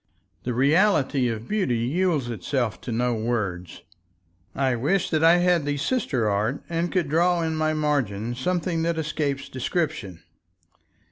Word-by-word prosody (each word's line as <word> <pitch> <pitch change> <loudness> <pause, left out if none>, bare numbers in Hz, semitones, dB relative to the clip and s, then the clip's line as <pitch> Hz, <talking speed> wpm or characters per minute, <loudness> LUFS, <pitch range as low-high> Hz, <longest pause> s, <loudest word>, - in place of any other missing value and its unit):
The 125 -1 -2
reality 140 - +3
of 115 -1 -4
beauty 190 - 0
yields 150 +3 0
itself 120 +1 -2
to 125 - -6
no 120 +2 +1
words. 110 -6 -3 0.7
I 130 -2 +1
wish 145 +11 0
that 155 0 +1
I 165 +2 +7
had 175 -2 +3
the 145 0 -1
sister 140 - 0
art 105 +6 -1
and 170 +1 -1
could 180 -5 0
draw 170 +3 +2
in 160 -1 -1
my 155 0 0
margin 120 -8 -1
something 170 +5 -1
that 165 0 0
escapes 150 -3 -2
description. 130 - -3
145 Hz, 145 wpm, -24 LUFS, 120-165 Hz, 0.7 s, I